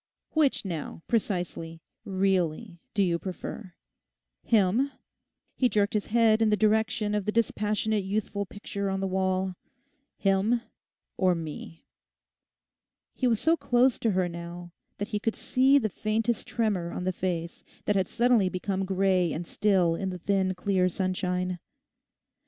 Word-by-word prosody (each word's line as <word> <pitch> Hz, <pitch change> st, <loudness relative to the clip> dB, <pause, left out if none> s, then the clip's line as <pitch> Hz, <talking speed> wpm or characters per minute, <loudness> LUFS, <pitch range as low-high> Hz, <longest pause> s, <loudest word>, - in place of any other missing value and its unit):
Which, 300 Hz, -8 st, +2 dB
now, 165 Hz, -2 st, -5 dB
precisely, 175 Hz, -7 st, -2 dB, 0.3 s
really 190 Hz, -1 st, 0 dB, 0.2 s
do 200 Hz, -, +4 dB
you 170 Hz, -2 st, +1 dB
prefer—him,' 180 Hz, -, -2 dB, 0.6 s
he 250 Hz, -, +2 dB
jerked 205 Hz, -1 st, +1 dB
his 210 Hz, -2 st, -1 dB
head 225 Hz, -1 st, +4 dB
in 220 Hz, -, +4 dB
the 210 Hz, -, +3 dB
direction 215 Hz, 0 st, +2 dB
of 210 Hz, -2 st, -1 dB
the 210 Hz, -, +1 dB
dispassionate 215 Hz, -1 st, 0 dB
youthful 200 Hz, 0 st, -2 dB
picture 200 Hz, 0 st, -4 dB
on 195 Hz, 0 st, -1 dB
the 195 Hz, -, -1 dB
wall, 190 Hz, 0 st, 0 dB, 0.6 s
'him 200 Hz, +4 st, +2 dB, 0.6 s
or 185 Hz, -1 st, +3 dB
me?' 150 Hz, -, -7 dB, 1.3 s
He 255 Hz, -, 0 dB
was 225 Hz, -3 st, +2 dB
so 325 Hz, +1 st, +3 dB
close 245 Hz, -4 st, +2 dB
to 230 Hz, -, +1 dB
her 185 Hz, -1 st, +1 dB
now 170 Hz, 0 st, -8 dB, 0.3 s
that 205 Hz, +2 st, -4 dB
he 210 Hz, -3 st, -1 dB
could 225 Hz, +1 st, -1 dB
see 265 Hz, +2 st, +3 dB
the 235 Hz, -6 st, +2 dB
faintest 220 Hz, +3 st, -1 dB
tremor 205 Hz, -7 st, 0 dB
on 180 Hz, -, -5 dB
the 185 Hz, 0 st, 0 dB
face 170 Hz, -2 st, -3 dB, 0.2 s
that 210 Hz, -, +1 dB
had 190 Hz, -2 st, +2 dB
suddenly 235 Hz, -5 st, +3 dB
become 190 Hz, +1 st, -2 dB
grey 190 Hz, -2 st, +2 dB
and 170 Hz, +3 st, -4 dB
still 185 Hz, -3 st, +2 dB
in 190 Hz, +3 st, -2 dB
the 180 Hz, -, -5 dB
thin 190 Hz, +1 st, 0 dB
clear 185 Hz, 0 st, +1 dB
sunshine. 180 Hz, -1 st, -1 dB
195 Hz, 145 wpm, -28 LUFS, 180-215 Hz, 1.3 s, do